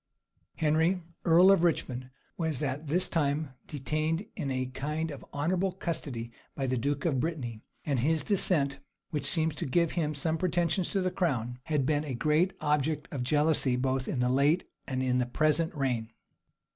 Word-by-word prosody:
Henry, 160 +4 +2 0.2
earl 175 +3 +7
of 195 - +5
Richmond, 130 -7 0 0.3
was 160 -4 -1
at 145 +2 -2
this 175 +6 +2
time 150 -2 0 0.2
detained 155 +5 -1
in 150 -7 -3
a 130 -1 -1
kind 150 +5 -3
of 140 - -8
honorable 180 +6 0
custody 145 -10 -4 0.2
by 135 - -2
the 130 0 0
duke 140 +3 -1
of 145 -6 +2
Brittany; 125 -8 -3 0.2
and 140 -4 +1
his 155 +5 +1
descent, 150 -9 +1 0.3
which 150 -3 -1
seemed 160 -3 +2
to - - -2
give 170 +4 +2
him 155 -3 -1
some 160 +3 0
pretensions 175 +1 +1
to 195 - 0
the 185 0 0
crown, 125 -10 -1
had 150 -4 +1
been 150 +1 +1
a 140 -4 -4
great 155 +8 +2
object 150 0 0
of 140 - -3
jealousy 145 0 +2
both 130 0 0
in - - -2
the 125 0 +2
late 145 +7 +3 0.2
and 130 -1 -1
in 125 -1 +2
the 125 - 0
present 155 +5 +2
reign. 125 -6 -1
150 Hz, 175 wpm, -30 LUFS, 130-165 Hz, 0.3 s, earl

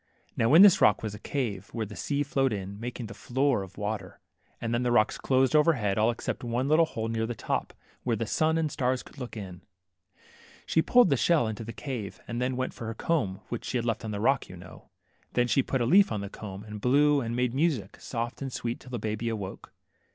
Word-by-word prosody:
Now 115 - +2
in 180 - +10
this 195 -1 +7
rock 105 +1 +4
was 110 -2 -3
a 105 - -8
cave, 110 -8 -3
where 115 -1 -2
the 105 0 -10
sea 145 0 -1
flowed 135 -2 +1
in, 100 0 -5
making 120 -1 -5
a - - -6
floor 130 +3 0
of 95 0 -10
water, 105 -2 -4 0.4
and 115 0 -2
then 120 - +1
the 125 -1 +1
rocks 110 -3 +3
closed 130 +2 +2
overhead, 130 -11 +3
all 110 +2 +4
except 120 - -3
one 120 +2 -1
little 160 +2 +4
hole 110 -5 -4
near 115 0 -1
the 120 - -4
top, - - -2 0.3
where 120 -2 0
the 115 - -2
sun 160 +7 +1
and 160 -1 +1
the - - -9
stars 125 0 0
could - - -15
look 125 -3 -6
in. 90 -4 -8 1.0
She 160 - +2
pulled 245 0 +5
the 140 - +4
shell 160 -3 +3
into 110 0 -4
this 115 0 -8
cave, 115 -4 -5
and 120 +1 -3
then 125 0 -1
went 130 - -2
for 115 - -7
her 115 - -4
comb 110 - -1
which 120 - -4
she 130 - -2
had 120 - -2
left 115 0 -1
on 110 - -4
the 105 -1 -3
rock, 135 +4 +1
you 90 - -9
know. 90 +2 -13 0.4
Then 125 - +3
she 135 - +3
put 130 0 -1
a - - +2
leaf 190 +7 +5
on 105 -2 -2
the 100 - -5
comb, 100 -2 -8
and 105 -1 -8
blew, 145 +3 +4
and 115 -1 -3
made 125 -1 0
music, 135 - 0
soft 120 +1 -4
and 135 -1 -4
sweet, 120 -1 -3
till - - -14
the 125 - -3
baby 110 +1 -2
awoke. 100 -4 -6
120 Hz, 245 wpm, -28 LUFS, 105-135 Hz, 1.0 s, in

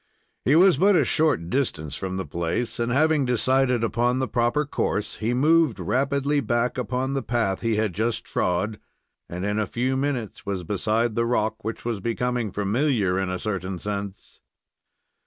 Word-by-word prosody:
He 135 - +3
was 180 -2 +6
but 200 +2 +5
a 155 -6 +4
short 145 - +1
distance 80 - -1
from 95 -1 -4
the 95 - -3
place, 85 +9 -3
and, 120 0 0
having 155 +2 +3
decided 125 0 +2
upon 120 +2 +1
the 130 0 0
proper 120 +5 +1
course, 105 -6 -2
he 110 +2 -1
moved 155 -1 +3
rapidly 140 - +1
back 120 -2 0
upon 130 +2 -2
the 135 - -1
path 115 -6 -1
he 115 -2 0
had 105 -3 0
just 110 +3 -1
trod, 95 +4 -1 0.5
and 90 +2 -4
in 105 +1 0
a 105 - 0
few 125 +5 -1
minutes 130 -5 -2
was 95 -2 -3
beside 110 +5 0
the 115 +1 0
rock, 110 -2 -1
which 110 +2 -5
was 115 -4 -2
becoming 120 +1 -1
familiar 105 -2 +1
in 95 -1 -1
a 90 - -2
certain 95 -2 -3
sense. 100 0 -6
115 Hz, 175 wpm, -24 LUFS, 100-130 Hz, 0.5 s, was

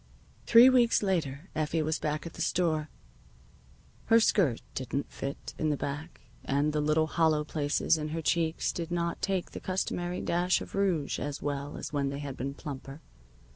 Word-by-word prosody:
Three 235 +2 +9
weeks 245 -4 +4
later 165 -4 -1
Effie 155 +1 0
was 155 +1 -1
back 150 +1 -2
at 170 - -7
the - - -7
store. 155 -3 +1 1.2
Her 230 - +6
skirt 175 - +2
didn't 130 +2 -3
fit 140 +1 -5
in 155 - +1
the 145 - 0
back, 145 +5 -5 0.2
and 145 +2 +1
the 150 - +1
little 155 +1 +2
hollow 155 -1 +2
places 150 +1 +1
in 150 - -3
her 160 +2 -3
cheeks 165 0 +1
did 170 -1 -4
not 170 -1 -2
take 190 -2 -1
the - - -6
customary 180 -1 -2
dash 175 +2 +2
of - - -9
rouge 185 -7 0
as 145 0 -4
well 145 0 -3
as - - -6
when 140 -1 0
they 140 - -4
had 140 -2 -5
been 140 +2 -4
plumper. 140 -1 -7
155 Hz, 175 wpm, -29 LUFS, 145-175 Hz, 1.2 s, Three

